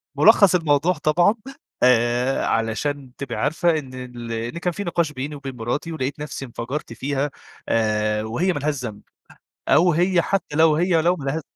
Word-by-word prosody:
ملخّص 195 -3 +6
الموضوع 160 +1 +2
طبعًا 175 +7 +2 0.5
آآ 125 +1 +3
علشان 125 +4 -1
تبقى 140 - -5
عارفة 160 +2 +1
إن 130 -3 -11
ال 125 -2 -7
إن 115 +7 -4
كان 175 0 -1
في 205 - -4
نقاش 170 -3 0
بيني 145 +2 -5
وبين 135 -2 -7
مراتي، 120 +8 -3
ولقيت 140 -1 -3
نفسي 145 -2 -5
انفجرت 120 +2 -5
فيها 140 +3 -2 0.4
آآ 105 -1 +1
وهي 170 +12 0
ما 145 - -3
لهاش 150 +1 -1
ذنب، 105 -3 -6 0.7
أو 175 +2 +5
هي 175 +1 +3
حتى 195 -6 -2
لو 160 -1 +5
هي 170 0 +2
لو 175 +2 +2
مله 145 +1 -3
145 Hz, 165 wpm, -22 LUFS, 125-165 Hz, 0.7 s, ملخّص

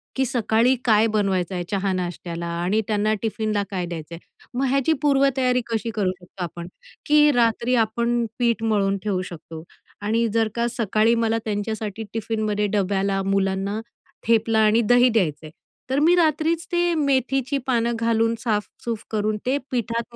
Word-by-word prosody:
की, 265 - +1
सकाळी 240 0 +2
काय 220 -1 +4
बनवायचं 195 -4 0
आहे 175 - -2
चहा-नाश्त्याला 180 -3 -2 0.2
आणि 205 +5 +1
त्यांना 215 0 +1
टिफिनला 215 -1 -1
काय 185 -2 -2
द्यायचं 170 -1 -7
आहे. - - -11 0.4
मग 270 - +1
ह्याची 275 +4 +2
पूर्वतयारी 270 -3 +2
कशी 230 0 -2
करू 195 -4 +1
शकतो 180 +1 -8
आपण? 170 0 -6 0.4
की 300 0 +5
रात्री 240 0 +2
आपण 235 +2 -1
पीठ 235 -2 +1
मळून 200 -3 +1
ठेवू 200 -3 -1
शकतो 160 -1 -9 0.4
आणि 225 +3 +1
जर 225 -1 +2
का 235 0 +1
सकाळी 220 +1 +2
मला 225 0 +1
त्यांच्यासाठी 215 0 -3
टिफिनमध्ये 215 -2 -1
डब्याला 195 0 0
मुलांना 195 +1 0 0.5
थेपला 225 -1 +3
आणि 220 +1 +4
दही 245 +3 +5
द्यायचं 165 -10 0
आहे, 155 - -10 0.4
तर 265 +2 +1
मी 335 +4 +5
रात्रीच 320 0 +1
ते 350 0 +2
मेथीची 270 -2 +1
पानं 235 -2 +1
घालून 230 0 +1
साफ-सफाई 225 0 -3
करून 215 0 0
ते 260 +3 +1
पिठात 235 -1 -2
220 Hz, 150 wpm, -23 LUFS, 200-245 Hz, 0.5 s, की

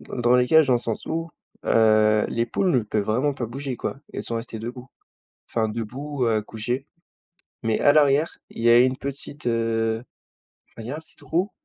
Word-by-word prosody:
dans - - -8
dans 120 +1 +4
les 125 0 +3
cages, 160 0 +6
dans 125 - +5
le - - +3
sens 115 -2 -4
où, 165 +1 -3 0.3
heu, 110 -1 +4
les 115 +1 -1
poules 185 - 0
ne 130 - +3
peuvent 105 -1 -2
vraiment 130 +7 +1
pas 120 - -3
bouger 135 +2 -5
quoi. 135 - -4
Elles - - -4
sont 115 - -3
restées 115 -1 -5
debout. 125 +2 -7 0.6
Enfin 110 -1 0
debout, 125 +5 -4
heu, 110 -2 +2
couchées. 120 +6 -4 0.8
Mais 110 -1 +1
à 145 - +6
l'arrière, 145 +1 +3
il 115 - -7
y 120 - +4
a 120 - +8
une 130 +1 +4
petite, 140 0 -5
heu, 115 0 0 0.6
enfin, 115 - -11
il 110 - -8
y - - -3
a 150 - -3
un - - -6
petit 160 - -10
trou, 180 +5 -1
120 Hz, 210 wpm, -24 LUFS, 115-140 Hz, 0.8 s, a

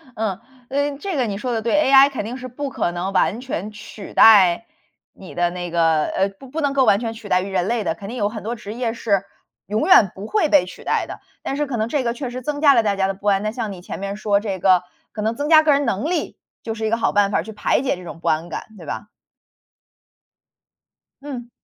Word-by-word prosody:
嗯， 210 -4 -2 0.3
呃， 285 +1 -1
这 385 +1 -4
个 255 -4 +1
你 200 -2 -3
说 245 +4 -3
得 225 - -1
对 230 +1 -1
，ai 275 0 +7
肯 265 -7 -4
定 235 +3 -5
是 255 0 -7
不 275 +3 -5
可 215 -9 -1
能 180 +3 -4
完 215 - +2
全 215 -6 -5
取 210 -1 -11
代 200 -2 +6 0.5
你 190 - -12
的 175 0 +1
那 175 0 -6
个 165 -2 +2
呃， 195 +1 0
不 195 +7 -15
不 305 +5 -4
能 285 -2 0
够 275 -1 +3
完 200 -3 +4
全 225 -1 -3
取 220 -2 -11
代 180 - +3
于 195 - -5
人 185 -1 0
类 230 -1 0
的， 165 - -1
肯 195 +3 -9
定 245 - -6
有 205 -3 +1
很 215 0 -6
多 230 +3 -3
职 210 -2 -8
业 235 -1 -2
是 205 -5 0 0.4
永 210 +5 0
远 220 - +6
不 195 +2 -8
会 375 - +1
被 295 -1 +5
取 - - -11
代 - - 0
的。 - - -8 0.2
但 275 - -3
是 295 +1 0
可 270 -4 -4
能 220 0 0
这 270 +3 -1
个 235 -1 0
确 250 +1 -5
实 250 +1 -6
增 290 +3 -3
加 290 -2 +6
了 235 -3 +4
大 205 -2 +1
家 190 -1 +2
的 195 - -1
不 200 +2 -8
安， 195 -1 +3
那 215 - -1
像 225 -3 -4
你 185 -2 -9
前 - - -7
面 200 +1 -4
说 205 -1 +1
这 195 -3 -4
个， 185 0 +4 0.3
可 210 - -5
能 220 +2 -1
增 285 +4 -3
加 315 -1 +7
个 310 - +4
人 285 0 +2
能 210 +9 -1
力， 355 -2 -2 0.2
就 225 - -4
是 220 0 -4
一 - - +1
个 230 - +1
好 230 - 0
办 200 -1 +3
法 - - +2
儿， - - -1
去 220 - -9
排 210 - +1
解 270 - 0
这 180 - -11
种 165 -1 -9
不 - - -6
安 160 +2 0
感， - - -5
对 170 - -11
吧？ 205 - -6 2.2
嗯。 255 -5 -7
220 Hz, 290 characters per minute, -21 LUFS, 195-255 Hz, 2.2 s, ai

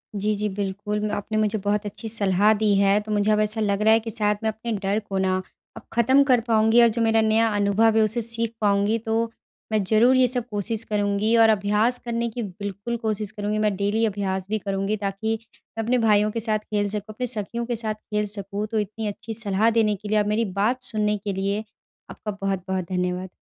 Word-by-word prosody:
जी, 210 +1 0
जी, 210 +1 -1
बिल्कुल 205 +1 -3
मैं 210 0 -2
आपने 215 +2 -3
मुझे 215 0 +1
बहुत 205 +1 0
अच्छी 210 +3 -6
सलाह 205 0 +3
दी 210 -2 +3
है, 200 +1 +4
तो 215 +1 -7
मुझे 205 +1 +2
अब 210 - +3
ऐसा 215 +1 0
लग 200 -1 0
रहा 220 +1 +5
है 225 - +5
कि 225 0 -7
शायद 210 -1 0
मैं 220 - +2
अपने 220 +2 -5
डर 200 +2 +1
को 200 -2 -5
ना, 185 0 +1 0.4
अब - - -8
ख़त्म 260 +4 +4
कर 245 -2 +4
पाऊँगी 220 +1 +5
और 235 - +7
जो - - +1
मेरा 225 0 +3
नया 225 +1 +3
अनुभव 210 +2 +3
है, - - +5
उससे 220 +3 0
सीख 230 0 -2
पाऊँगी। 205 +1 +2
तो, 225 +1 0 0.4
मैं 215 -2 +2
ज़रूर 220 +6 +4
ये 255 -1 +5
सब 245 -1 -2
कोशिश 210 +2 -1
करूँगी 205 +1 0
और 225 - +6
अभ्यास 215 +4 +2
करने 235 0 -1
की 235 +1 -5
बिल्कुल 200 +3 -5
कोशिश 215 -2 -2
करूँगी, 210 0 -3
मैं 210 -2 +1
डेली 205 +3 +1
अभ्यास 190 -3 -2
भी 215 - 0
करुँगी 195 +1 -2
ताकि 215 +3 -2 0.4
मैं 225 - -1
अपने 245 +3 +1
भाइयों 210 -2 +3
के 230 - -3
साथ 215 0 +2
खेल 210 -1 -2
सकूँ, 210 +1 -4
अपने 250 +3 -3
सखियों 235 +1 -3
के 240 0 -2
साथ 220 -1 -2 0.2
खेल 210 0 0
सकूँ। 200 +1 -4
तो 220 - +1
इतनी 215 +1 -4
अच्छी 210 +2 -6
सलाह 210 0 +1
देने 210 -2 +2
के 210 +2 -10
लिए 215 - +2
और 210 - +1
मेरी 225 +2 +1 0.2
बात 245 +5 +1
सुनने 210 -1 0
के 200 0 -4
लिए, 200 +2 -1 0.5
आपका 210 - -6
बहुत-बहुत 190 -1 -2
धन्यवाद। 180 0 -2
215 Hz, 225 wpm, -24 LUFS, 200-225 Hz, 0.5 s, और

